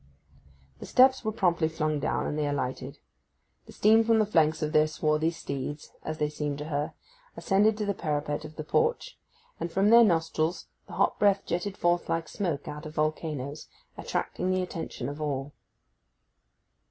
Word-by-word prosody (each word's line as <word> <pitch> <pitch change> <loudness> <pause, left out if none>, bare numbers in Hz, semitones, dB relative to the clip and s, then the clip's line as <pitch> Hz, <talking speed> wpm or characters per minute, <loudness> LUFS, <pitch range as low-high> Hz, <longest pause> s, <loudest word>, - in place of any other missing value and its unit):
The - - -8
steps 260 0 +5
were 220 - -1
promptly 175 -6 +1
flung 155 -2 -1
down, - - -1
and - - -2
they 150 -1 0
alighted. 135 -1 -3 0.7
The - - -11
steam 220 +2 +4
from 225 0 +3
the 215 - +3
flanks 160 -5 +2
of 155 - -1
their 155 0 +4
swarthy 155 +1 +1
steeds, 145 -3 -6
as 155 0 -5
they 150 - +1
seemed 150 -1 -3
to 150 +2 -6
her, 145 0 -2 0.4
ascended 210 +2 +3
to 210 - -2
the 200 - 0
parapet 150 -3 -2
of 155 0 -10
the 155 - -5
porch, 470 - 0 0.4
and 170 - -3
from 195 +4 +3
their 235 0 +9
nostrils 165 -3 0 0.2
the - - -11
hot - - +1
breath 200 -1 +3
jetted 185 +3 -3
forth 175 0 +1
like 165 0 -1
smoke 170 -8 -3
out 150 +1 -6
of 155 - -11
volcanoes, 155 -2 -2 0.3
attracting 185 - -3
the 185 0 +1
attention 170 -2 -5
of 145 +2 -6
all. 140 -1 -3
160 Hz, 175 wpm, -28 LUFS, 150-195 Hz, 0.7 s, their